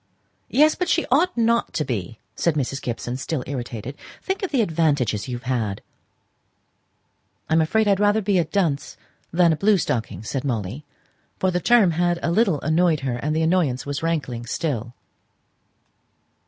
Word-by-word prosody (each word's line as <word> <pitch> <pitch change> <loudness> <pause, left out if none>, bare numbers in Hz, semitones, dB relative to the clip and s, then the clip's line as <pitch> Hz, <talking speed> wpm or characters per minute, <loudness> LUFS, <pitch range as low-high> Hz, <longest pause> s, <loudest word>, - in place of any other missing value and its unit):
"Yes; 305 +3 +5
but 360 - -2
she 335 - +2
ought 330 +4 +3
not 235 0 +2
to 150 - -1
be," 110 -2 -4 0.2
said 170 -3 +1
Mrs. 135 -2 -2
Gibson, 120 +1 -4
still 135 0 -3
irritated. 125 -1 -5 0.3
"Think 385 0 -2
of 385 - -2
the 260 -6 +2
advantages 145 - 0
you've 125 -1 -5
had." 115 -6 -2 1.6
"I'm 160 +1 +3
afraid 215 +7 +2
I - - +5
had 195 - +2
rather 205 +1 +3
be 190 -1 +2
a 170 - +1
dunce 160 -5 -1 0.3
than 170 -1 +4
a - - 0
blue 200 +5 +3
stocking," 110 - -2
said 130 +4 -3
Molly; 120 +1 -3 0.5
for 185 - +1
the 180 - 0
term 210 0 +4
had 175 +1 +1
a 170 - +1
little 190 -5 +2
annoyed 160 -1 +2
her, 130 -3 -2
and 150 +5 -2
the 160 - +1
annoyance 160 -7 +1
was 145 0 -3
rankling 140 -8 -2
still. 120 -4 -3
155 Hz, 170 wpm, -23 LUFS, 125-190 Hz, 1.6 s, Yes